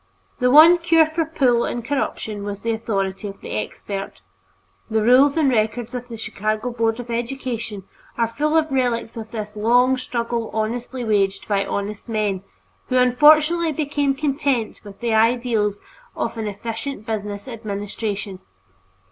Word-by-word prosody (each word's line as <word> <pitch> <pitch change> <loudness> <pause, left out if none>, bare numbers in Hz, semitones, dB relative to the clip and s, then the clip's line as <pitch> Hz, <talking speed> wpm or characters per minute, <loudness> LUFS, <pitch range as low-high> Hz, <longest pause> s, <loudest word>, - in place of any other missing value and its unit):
The 250 - +3
one 320 +6 +8
cure 330 -1 +5
for 315 +1 -1
"pull" 255 -7 +2
and 240 -1 -3
corruption 220 -6 -2
was 200 0 -5
the 230 - -1
authority 205 -3 -2
of 200 0 -9
the - - -8
"expert." 195 - -5 0.7
The 220 -1 +1
rules 265 +6 +5
and 310 -3 +3
records 230 -1 0
of 245 -1 -5
the 230 -2 -8
Chicago 215 +2 -2
Board 230 -1 0
of 240 -1 -6
Education 235 -4 -4 0.3
are 230 - +3
full 300 +8 0
of 315 -2 +1
relics 245 -4 0
of 225 -1 -7
this 215 -2 -6
long 245 +4 +3
struggle 235 -2 -3
honestly 240 +3 -2
waged 200 -3 0
by 200 -2 +1
honest 200 +3 -4
men, 210 -4 -1 0.5
who 255 - +1
unfortunately 305 +6 +5
became 290 -2 0
content 275 -5 -1
with 205 0 -12
the 235 -2 0
ideals 225 -2 +2 0.4
of - - -2
an 220 -1 -3
"efficient 225 +3 -5
business 210 0 -4
administration." 205 -3 -5
230 Hz, 150 wpm, -22 LUFS, 210-260 Hz, 0.7 s, one